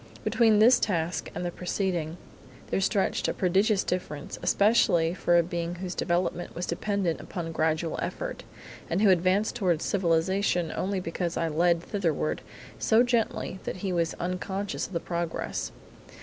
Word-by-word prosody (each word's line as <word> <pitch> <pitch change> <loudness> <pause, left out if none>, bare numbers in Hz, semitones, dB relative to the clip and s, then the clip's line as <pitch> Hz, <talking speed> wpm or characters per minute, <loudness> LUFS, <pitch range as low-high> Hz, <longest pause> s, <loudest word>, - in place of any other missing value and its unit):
Between 225 -3 +4
this 235 +4 +6
task 170 -4 -1
and 180 - -3
the 175 - -2
preceding 175 -3 -2 0.5
there - - +1
stretched 195 0 +1
a - - -1
prodigious 195 +3 +2
difference, 150 -5 -4
especially 175 -6 +3
for 175 -1 +2
a 170 - +5
being 170 0 -3
whose 180 0 -5
development 175 0 -1
was 175 - -2
dependent 185 -1 -1
upon 165 -2 -5
gradual 160 +1 0
effort, - - -4 0.5
and 180 +5 +1
who 200 - +7
advanced 185 +5 +2
toward 180 -8 +1
civilisation 175 0 +1
only 195 0 -1
because 175 0 -3
I 165 - 0
led 170 +2 +2
thitherward 160 - -1 0.4
so 225 +2 +4
gently 235 -5 -1
that - - -4
he 190 - 0
was 170 -1 0
unconscious 190 +3 -3
of - - -14
the 170 - 0
progress. 170 -1 -3
180 Hz, 150 wpm, -27 LUFS, 170-195 Hz, 0.5 s, who